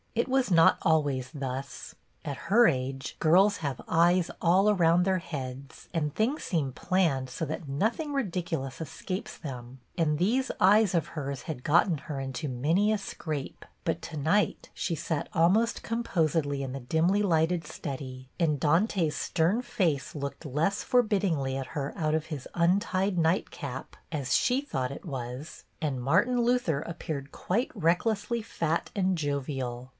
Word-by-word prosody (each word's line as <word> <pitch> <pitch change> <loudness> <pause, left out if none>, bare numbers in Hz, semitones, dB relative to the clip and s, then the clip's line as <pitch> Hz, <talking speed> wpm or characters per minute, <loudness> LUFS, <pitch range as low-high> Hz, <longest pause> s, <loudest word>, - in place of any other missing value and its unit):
It 235 - +1
was 260 -4 +1
not 165 -2 +6
always 145 -5 +1
thus. 135 -3 -5 0.3
At 140 - -3
her 235 +4 +7
age 135 +1 -2
girls 190 +6 +5
have 140 -5 -3
eyes 170 +2 +3
all 185 +4 +4
around 175 -3 +4
their 190 0 +2
heads, 135 -4 -7
and 150 -4 -1
things 245 +8 0
seem 145 -7 -1
planned 160 -7 +1
so 145 +6 -3
that 155 0 -5
nothing 225 - 0
ridicu 180 - -1
lous 135 +2 -7
escapes 160 +4 -5
them, 125 -3 -8 0.2
and 155 -3 +2
these 240 - +1
eyes 200 0 +5
of 165 -2 0
hers 140 -3 -5
had 145 -6 -6
got 165 +1 +3
her 150 -3 -5
into 135 +2 -4
many 160 - +2
a 215 - +2
scrape; 155 -7 -5 0.2
but - - -1
to 160 - -7
night 160 +9 +1
she 170 - -2
sat 160 -1 -3
almost 190 +7 +3
composedly 165 -11 0
in 130 -1 -4
the 135 - -4
dimly 165 +10 +2
lighted 165 -3 +2
study, 130 -4 -6
and 155 -4 +2
Dante's 165 - +2
stern 180 +8 +1
face 190 - -1
looked 140 +2 -5
less 155 +8 0
forbiddingly 195 - +1
at 135 -1 -3
her 145 -3 -4
out 155 -1 0
of 160 0 -1
his 150 -6 -6
un 175 +3 +3
tied 195 -3 -1
night 165 +2 +2
cap 135 -2 -7 0.2
(as 135 -6 -1
she 255 - +3
thought 130 - -3
it 140 - -8
was), 130 0 -6 0.2
and 140 -5 -2
Martin 240 - +3
Luther 235 - +1
appeared 155 -4 -5
quite 230 +8 -1
recklessly 205 +6 +1
fat 165 -6 -2
and 190 -2 +1
jovial. 135 -4 -3
160 Hz, 160 wpm, -28 LUFS, 140-190 Hz, 0.3 s, her